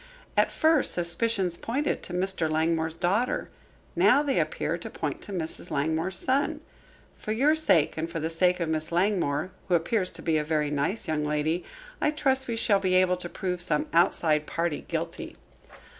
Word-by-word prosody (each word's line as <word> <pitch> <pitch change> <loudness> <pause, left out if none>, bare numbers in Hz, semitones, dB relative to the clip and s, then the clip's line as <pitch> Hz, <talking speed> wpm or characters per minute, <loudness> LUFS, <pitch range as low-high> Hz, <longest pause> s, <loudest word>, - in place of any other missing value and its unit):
At - - +3
first 315 -3 +3
suspicions 180 +1 0
pointed 275 +10 -2
to - - -9
Mr. 180 -3 0
Langmore's 160 +1 0
daughter; 195 +9 0 0.5
now 290 - +5
they 280 -2 +1
appear - - -1
to - - -7
point - - -4
to - - -9
Mrs. 170 -4 -3
Langmore's 160 +5 -1
son. 265 +6 0 0.5
For 215 - -6
your 280 +7 +3
sake 195 - +2
and 165 +1 -2
for 165 -1 -4
the 160 +1 -2
sake 180 +2 +2
of 170 - -1
Miss 155 0 -1
Langmore, 180 -3 0 0.2
who 180 - +3
appears 185 +3 0
to - - -6
be 160 -2 +2
a - - -1
very 150 -1 0
nice 150 +9 -1
young 155 -1 -1
lady, 150 +3 -1 0.4
I - - +3
trust 265 -3 +1
we 235 - -2
shall 210 -3 +3
be 185 -1 +1
able 185 0 +3
to 175 -1 -6
prove 180 -1 -3
some 160 -4 +1
outside 155 -2 +2
party 165 -2 -2
guilty." - - -5
175 Hz, 180 wpm, -27 LUFS, 160-210 Hz, 0.5 s, now